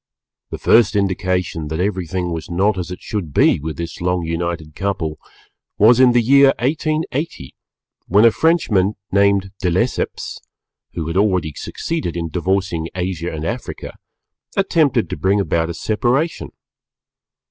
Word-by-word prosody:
The - - -5
first 110 -2 +4
indication 95 -5 -1
that 80 +2 -4
everything 90 -2 -2
was 80 -1 -5
not 95 +5 +1
as 90 -1 -4
it 90 - -7
should 90 -10 -4
be - - +4
with 80 +2 -5
this 85 0 -6
long 90 -1 0
united 80 -2 -3
couple, 80 -5 -3 0.6
was 115 +4 +6
in 125 -2 +6
the 120 -1 +3
year 140 +3 +5
1880, 155 - -2 0.5
when 105 +5 +5
a 115 - +7
Frenchman 105 - +2 0.2
named 100 -1 +2
De 90 - +1
Lesseps 105 +9 -2 0.6
(who 80 - -3
had 85 +3 -2
already 90 -6 +1
succeeded 155 - -4
in 85 -1 -3
divorcing 90 -1 -1
Asia 90 -2 -3
and 80 0 -5
Africa) 120 +7 -5 0.6
attempted 155 - +2
to - - -5
bring 100 +2 +2
about 85 -4 0
a - - -3
separation. 125 - -1
95 Hz, 145 wpm, -19 LUFS, 85-115 Hz, 0.6 s, a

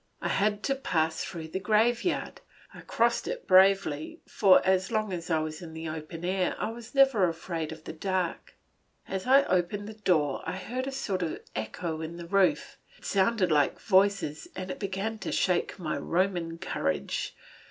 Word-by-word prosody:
I - - -2
had 210 +1 +1
to 275 - +1
pass 160 -12 -1
through 160 -3 -6
the 190 - -3
graveyard; 225 - +1 0.3
I - - -11
crossed - - +1
it - - -4
bravely, 190 -5 +4
for 195 -3 +5
as 190 +1 +2
long 215 -3 0
as 170 -2 -5
I 160 - +3
was 155 +2 -5
in 160 -2 -9
the 160 0 -5
open 160 +2 -6
air 185 0 0
I 215 - -2
was 235 +3 -11
never 265 -10 +5
afraid 165 -1 -4
of 160 0 -9
the - - -7
dark. 185 +1 -2 0.5
As 190 +3 -4
I 275 +2 +7
opened 185 +3 0
the 220 - -7
door 165 -10 +1
I - - -4
heard 250 +7 -4
a - - -2
sort 200 -8 -2
of 165 -3 -2 0.2
echo 155 +9 -4
in 160 +1 -6
the 170 - -7
roof; 190 +1 +1 0.2
it - - -17
sounded 195 -2 +2
like 145 -2 +2
voices 195 - +2
and 185 0 -5
it - - -7
began 200 +3 -3
to - - -4
shake 180 -2 +1
my 165 -5 -3
Roman 175 -2 -1
courage. 80 - -2
185 Hz, 185 wpm, -28 LUFS, 165-210 Hz, 0.5 s, I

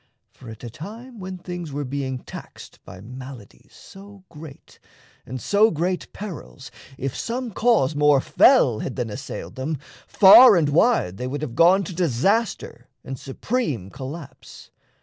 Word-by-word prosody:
For 125 - -14
at 110 +1 -11
a 120 - -6
time 225 - -10
when 185 0 -7
things 175 -3 -7
Were 145 +1 -4
being 130 0 -4
taxed - - -12
by 90 - -12
maladies 125 -1 -12
so 200 0 -14
great, 155 -3 -13 0.5
And 130 +2 -6
so 205 - +3
great 175 +2 -3
perils, 175 -9 -9 0.3
if 135 0 -4
some 240 0 -4
cause 210 - +2
more 145 -1 +4
fell 135 - +4
Had 125 - -5
then 120 -4 -3
assailed 130 +7 -7
them, 145 +4 -3 0.3
far 215 +3 +8
and 160 -4 +2
wide 145 - +2
they 125 - -4
would 145 +3 -4
Have 130 -6 -5
gone 175 +8 +4
to 180 - -7
disaster 175 - -1 0.2
and 130 0 -7
supreme 135 - -3
collapse. 140 +3 -10
150 Hz, 150 wpm, -22 LUFS, 130-195 Hz, 0.5 s, far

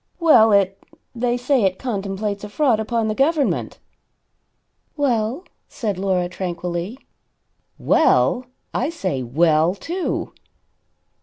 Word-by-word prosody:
"Well, 245 -10 +6
it 195 -1 +2 0.3
they 240 0 0
say 255 +1 +1
it 190 -2 +1
contemplates 200 -3 -3
a 210 - -6
fraud 245 -1 +2
upon 225 0 -1
the 215 - 0
government." 285 +4 0 1.2
"Well?" 250 +1 0 0.3
said 205 -6 -3
Laura 185 -2 0
tranquilly. 175 +3 -4 0.8
"Well! 250 0 +2 0.3
I 265 - 0
say 185 - -3
'Well?' 155 +7 +2
too." 350 - -3
215 Hz, 105 wpm, -21 LUFS, 185-250 Hz, 1.2 s, Well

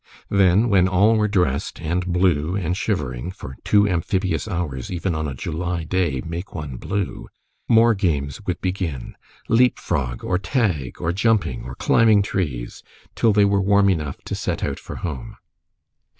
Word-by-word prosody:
Then, 100 +3 +4
when 95 -4 +4
all 100 +5 +4
were 105 -1 +2
dressed, 90 -12 0
and 85 +4 -2
blue 90 -2 +1
and 90 -3 -1
shivering 70 - -2
for 65 -7 -9
two 105 0 +4
amphibious 95 +3 -1
hours, 85 - -3
even 90 0 -1
on 80 -1 -2
a 70 - -5
July 85 +5 -3
day, 80 -6 -1
make 85 +5 -6
one 75 -7 -5
blue 100 +5 -3 0.4
more 115 0 +6
games 80 -7 -1
would 90 - -1
begin, 90 -8 -3 0.3
leap 125 +2 +4
frog, 65 -8 -2
or 90 - 0
tag, 95 - -1
or 85 - 0
jumping, 95 - +1
or 65 +1 -7
climbing 110 +3 +4
trees, 70 -12 -3 0.3
till 115 - +3
they 105 0 +4
were 100 0 +2
warm 100 0 +4
enough 75 -6 -2
to - - -5
set - - -2
out - - -2
for - - -8
home. 70 -8 -6
90 Hz, 165 wpm, -22 LUFS, 75-100 Hz, 0.4 s, more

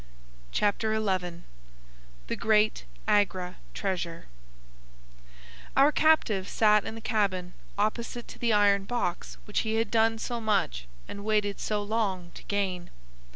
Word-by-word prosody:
Chapter 215 +1 +1
XI 185 -5 -1 0.8
The - - -3
Great 215 - +2 0.2
Agra 185 -3 +1 0.2
Treasure 175 -4 -3 1.5
Our 280 +2 +6
captive 240 -13 +3
sat 210 -2 +4
in 220 - -5
the 225 - -8
cabin 190 -5 0 0.2
opposite 230 +3 -2
to - - -11
the 235 -1 +1
iron 200 -2 +4
box 175 - -3
which - - -1
he 220 0 -1
had 225 -1 0
done 225 0 +3
so 235 +1 -4
much 130 - 0 0.2
and 200 - -7
waited 210 -1 0
so 210 -1 -1
long 200 -5 -1
to - - -10
gain. 190 -4 -2
205 Hz, 130 wpm, -28 LUFS, 185-220 Hz, 1.5 s, Our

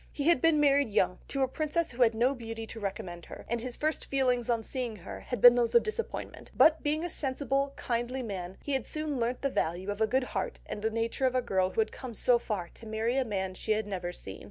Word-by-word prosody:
He 285 - -3
had 335 -7 +4
been 325 -2 +4
married 285 -3 +4
young, 185 -3 +1
to 275 -1 0
a - - +2
princess 310 +4 -1
who 245 +1 -5
had 230 -2 +5
no 245 +4 +3
beauty 225 -3 -6
to 225 - -9
recommend 185 -4 -5
her, - - -10
and 235 0 -1
his 250 0 -4
first 310 +1 -1
feelings 250 -3 +1
on 230 -2 +1
seeing 245 -2 -4
her 180 - -8
had 245 - -5
been 245 -1 +10
those 240 -1 +1
of 475 - +7
disappointment, 440 +1 -5
but 315 0 +6
being 305 +2 0
a - - -1
sensible, 275 -2 0
kindly 245 +1 -2
man, 190 -4 -5
he 285 - -4
had 265 -4 -1
soon 305 -3 -3
learnt 240 +3 -1
to 275 - +2
value 185 -2 -1
the 220 +2 +1
good 260 +4 +2
heart - - -3
and 205 - -6
nature 230 +4 0
of 255 - -1
the 255 - +2
girl 190 -5 +1
who 220 - +1
had 220 - -1
come 250 -4 -8
so 245 +1 +4
far 195 -7 -3
to 225 - -13
marry 220 +3 -1
a 270 - +3
man 190 -5 -2
she 215 +3 -1
had 215 0 -1
never 185 -3 -4
seen. 95 - -8
240 Hz, 250 wpm, -30 LUFS, 215-275 Hz, -, been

